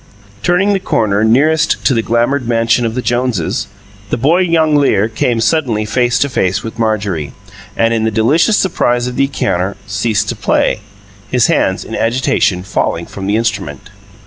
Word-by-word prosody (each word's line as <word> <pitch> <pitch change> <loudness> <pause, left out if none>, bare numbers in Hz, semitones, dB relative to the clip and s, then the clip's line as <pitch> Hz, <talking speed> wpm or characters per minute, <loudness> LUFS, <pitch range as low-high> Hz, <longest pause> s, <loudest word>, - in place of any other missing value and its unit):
Turning 185 - +2
the 195 - +1
corner 105 - 0
nearest 150 +8 +2
to 135 - +4
the 115 - +1
glamoured 120 +3 0
mansion 115 0 +1
of 110 - -5
the 125 - -2
Joneses, 120 -6 -1 0.4
the - - -1
boy 160 +9 +2
jongleur 150 - +2
came 115 +1 -1
suddenly 115 -3 0
face 120 +2 +1
to 140 - +1
face 95 -8 -1
with 110 0 -7
Marjorie, 100 -10 -1 0.4
and, 115 0 +2
in 115 -1 0
the 110 - +2
delicious 140 - +2
surprise 120 -10 +1
of 125 0 -4
the 135 - +2
encounter, 100 -8 -2
ceased 105 +2 -1
to - - -2
play, - - 0 0.5
his 125 -2 +2
hands, 95 0 0
in 115 - -6
agitation, 115 -6 0
falling 85 -2 -2
from 95 -1 -7
the 105 - +1
instrument. 105 -10 -3
115 Hz, 170 wpm, -14 LUFS, 105-135 Hz, 0.5 s, to